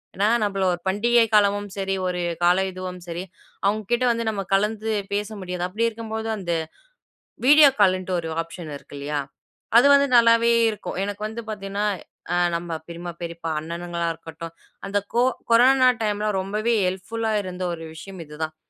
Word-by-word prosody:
ஏனா, 200 +2 +2 0.2
நம்மள 195 -2 -1
ஒரு 175 - -4
பண்டிகை 235 +5 +3
காலமும் 205 -1 +3
சரி, 195 0 -1
ஒரு 180 -1 -2 0.2
கால 180 +2 +5
இதுவும் 185 -1 -7
சரி. 170 +1 -4 0.4
அவங்க 215 +2 +1
கிட்ட 240 +1 +2
வந்து 230 0 -1
நம்ம 205 -2 -2
கலந்து 215 +2 +1 0.2
பேச 205 0 0
முடியாது. 180 -1 -4
அப்டி 210 +5 -2
இருக்கும்போது 220 0 -5
அந்த 175 -3 -2 0.9
வீடியோ 295 +1 +8
கால்ன்ட்டு 185 -2 +3
ஒரு 165 - -5
ஆப்ஷன் 165 0 -8
இருக்கு 140 - -14
இல்லையா, 145 +1 -3 0.6
அது 250 +4 +7
வந்து 280 0 +5
நல்லாவே 230 0 +5 0.2
இருக்கும். 210 -4 -5
எனக்கு 205 +1 -5
வந்து 220 +2 -6
பார்த்தீங்கன்னா, 200 0 -3 0.7
நம்ப 170 0 -4 0.2
பெரியம்மா, 170 +1 -6
பெரியப்பா, 170 -1 -5
அண்ணனுங்களா 170 +2 -4
இருக்கட்டும். 165 +1 -9 0.3
அந்த 200 - 0 0.2
கோ 240 +1 +3 0.3
கொரோனா 255 +2 +6
டைம்ல 210 0 0
ரொம்பவே 210 +4 -1
ஹெல்ப்புல்லா 220 +5 -2
இருந்த 185 0 -5
ஒரு 165 -1 -7
விஷயம் 190 +2 -9
இதுதான். 155 +1 -5
195 Hz, 155 wpm, -23 LUFS, 175-220 Hz, 0.9 s, வீடியோ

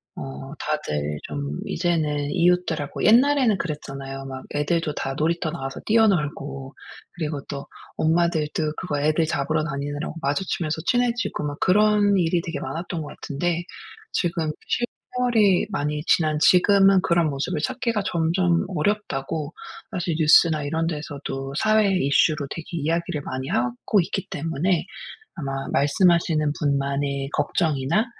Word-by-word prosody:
어 135 +1 -7
다들 75 - -2
좀 70 0 -4
이제는 150 -4 0
이웃들하고 175 -4 +1
옛날에는 250 -1 +5
그랬잖아요. 135 -4 -5
막 130 -1 -7
애들도 150 +1 0
다 135 - -3
놀이터 165 +1 0
나와서 135 -5 -5
뛰어놀고 150 -11 +1 0.4
그리고 155 -4 -3
또 140 -1 -6 0.3
엄마들도 160 -2 +1
그거 150 -6 -2
애들 155 +2 +2
잡으러 150 0 0
다니느라고 145 +1 -4
마주치면서 160 +1 -1
친해지고 245 -8 0
막 145 0 -4
그런 205 +1 +4
일이 170 -1 +2
되게 165 0 -5
많았던 165 +5 -4
것 150 - -6
같은데 170 +4 -2 0.5
지금 165 -3 0 0.7
세월이 220 -7 +3
많이 150 -5 -2
지난 155 -2 +3
지금은 195 +3 +5
그런 170 -3 +2
모습을 140 +1 -2
찾기가 230 +2 -1
점점 170 +1 +1
어렵다고 160 -7 -2 0.4
사실 175 -2 -2
뉴스나 155 -1 +5
이런 160 +3 -1
데서도 140 -3 -5
사회 215 +1 +3
이슈로 140 0 +2
되게 165 +1 -6
이야기를 165 -1 -1
많이 130 -1 -5
하고 125 - +1
있기 185 +2 -3
때문에 165 +4 -1 0.5
아마 135 -4 -4
말씀하시는 155 +1 +3
분만의 140 -1 -1
걱정이나 160 - +1
160 Hz, 315 characters per minute, -24 LUFS, 145-180 Hz, 0.7 s, 옛날에는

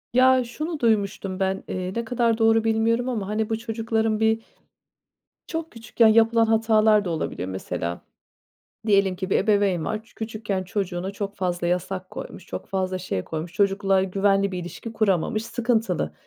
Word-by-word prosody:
Ya, 255 +1 +5
şunu 305 +7 -5
duymuştum, 200 -5 0
ben, 190 0 0
eee, 185 0 -3
ne 235 0 -2
kadar 230 -1 +1
doğru 225 0 +4
bilmiyorum 225 +2 +1
ama, 215 -6 -2
hani, 215 +1 -1
bu 225 - 0
çocukların 225 -1 -1
bir 220 0 +2 1.1
çok 325 -1 -4
küçükken 230 0 +2
yapılan 225 +1 +5
hatalar 220 -1 +4
da - - -2
olabilir. 160 - -3
Mesela, 90 -2 -4 0.9
diyelim 195 -3 +3
ki, 190 +1 -4
bir - - +4
ebeveyn 200 -5 +2
var, 215 +6 -3
çü 225 - -25
küçükken 215 -3 -3
çocuğuna 185 -1 -3
çok 200 0 -5
fazla 175 -2 -1
yasak 185 +1 -2
koymuş, 185 - -8
çok - - -6
fazla 185 -1 -1
şey 95 - -3
koymuş, 160 +2 -5
çocukla 195 0 +2
güvenli 195 +1 +1
bir 180 - -3
ilişki 180 +6 -7
kuramamış, 215 0 +1
sıkıntılı, 225 - 0
210 Hz, 160 wpm, -24 LUFS, 185-225 Hz, 1.1 s, Ya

